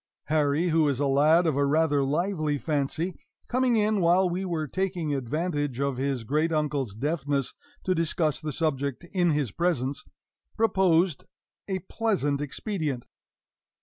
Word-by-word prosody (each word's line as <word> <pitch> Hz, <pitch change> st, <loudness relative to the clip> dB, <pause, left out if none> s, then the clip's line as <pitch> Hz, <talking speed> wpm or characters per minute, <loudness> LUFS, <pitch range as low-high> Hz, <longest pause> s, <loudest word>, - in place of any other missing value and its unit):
Harry, 155 Hz, +2 st, +2 dB
who 160 Hz, -2 st, +3 dB
is 135 Hz, -2 st, -1 dB
a 145 Hz, -, +1 dB
lad 150 Hz, +5 st, +4 dB
of 155 Hz, -4 st, +1 dB
a 140 Hz, -, +2 dB
rather 145 Hz, 0 st, +2 dB
lively 155 Hz, +1 st, 0 dB
fancy, 155 Hz, +4 st, -2 dB, 0.3 s
coming 250 Hz, -1 st, +2 dB
in 210 Hz, -1 st, +2 dB
while 175 Hz, +2 st, +4 dB
we 180 Hz, +2 st, -2 dB
were 170 Hz, -4 st, -2 dB
taking 180 Hz, -2 st, -2 dB
advantage 145 Hz, 0 st, -2 dB
of 140 Hz, -2 st, -1 dB
his 135 Hz, -2 st, -1 dB
great 150 Hz, +7 st, 0 dB
uncle's 145 Hz, -8 st, -1 dB
deafness 140 Hz, +1 st, -1 dB, 0.3 s
to 185 Hz, -, +1 dB
discuss 165 Hz, -2 st, 0 dB
the 155 Hz, -1 st, -3 dB
subject 140 Hz, -1 st, -2 dB
in 180 Hz, -3 st, +2 dB
his 145 Hz, -7 st, 0 dB
presence, 140 Hz, -, -1 dB, 0.5 s
proposed 190 Hz, -7 st, +2 dB, 0.4 s
a 190 Hz, -2 st, -1 dB
pleasant 180 Hz, -11 st, 0 dB
expedient. 145 Hz, -, -3 dB
155 Hz, 145 wpm, -27 LUFS, 140-175 Hz, 0.5 s, lad